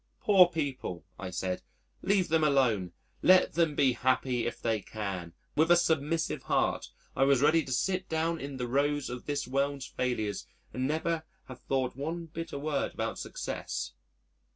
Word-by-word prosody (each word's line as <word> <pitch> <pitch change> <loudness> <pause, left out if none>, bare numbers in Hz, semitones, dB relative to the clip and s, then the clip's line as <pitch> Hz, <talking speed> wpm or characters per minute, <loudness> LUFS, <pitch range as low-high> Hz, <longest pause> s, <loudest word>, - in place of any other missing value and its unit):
"Poor 190 -3 +7
people," 135 - -4
I 95 - -4
said. 90 0 -2 0.4
"Leave 195 -3 +2
them 160 0 +3
alone. 125 - +2 0.3
Let 185 0 +5
them 165 -2 +2
be 135 -3 +4
happy 125 -1 +1
if - - -4
they 110 -2 0
can." 95 -6 -5 0.2
With 160 +2 +3
a 175 - +8
submissive 160 -1 +1
heart, - - 0 0.3
I - - +3
was 135 -1 +4
ready 160 +2 +5
to 135 - -7
sit 185 +8 0
down 165 +1 0
in 140 -1 -6
the 125 -1 -2
rows 145 +2 0
of 125 0 -7
this 145 -4 -1
world's 140 +1 -1
failures 110 -5 -2 0.3
and 130 +1 -1
never 160 +2 -1 0.2
have 130 -1 -10
thought 130 -2 -1
one 165 +5 -4
bitter 165 -1 -6
word 145 0 -2
about - - -3
success. - - -4
140 Hz, 165 wpm, -30 LUFS, 125-160 Hz, 0.4 s, a